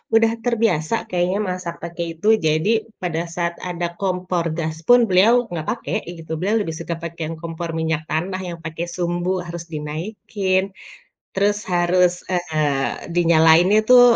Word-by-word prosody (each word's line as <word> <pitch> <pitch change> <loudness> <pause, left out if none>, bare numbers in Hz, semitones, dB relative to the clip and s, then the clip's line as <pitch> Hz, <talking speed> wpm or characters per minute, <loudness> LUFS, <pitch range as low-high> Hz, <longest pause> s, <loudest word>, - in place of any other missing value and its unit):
udah 225 0 +5
terbiasa 225 -6 +1
kayaknya 180 +2 0
masak 180 -2 -4
pakai 170 0 -4 0.2
itu, 210 - -2 0.2
jadi 200 +9 +2 0.2
pada 170 -2 -1
saat 170 -1 -1
ada 175 -1 -2
kompor 180 -3 -1
gas 160 -1 -2
pun, 245 0 +8
beliau 225 +6 +4
nggak 165 -3 -3
pakai 230 - -4 0.2
gitu, 160 0 -10
beliau 200 +5 +1
lebih 165 -6 -3
suka 170 0 -3
pakai 170 0 -6
yang 165 - -6
kompor 170 0 -5
minyak 160 -1 0
tanah 180 +5 -1
yang 170 -1 -5
pakai 165 +1 -4
sumbu 175 +1 -1
harus 170 0 -6
dinaikin, 185 +5 -2 0.6
terus 205 +1 +3
harus, 180 0 +2
eee, 155 -6 -1
dinyalainnya 170 +3 +5
tuh 250 -1 +9
175 Hz, 150 wpm, -21 LUFS, 165-190 Hz, 0.6 s, tuh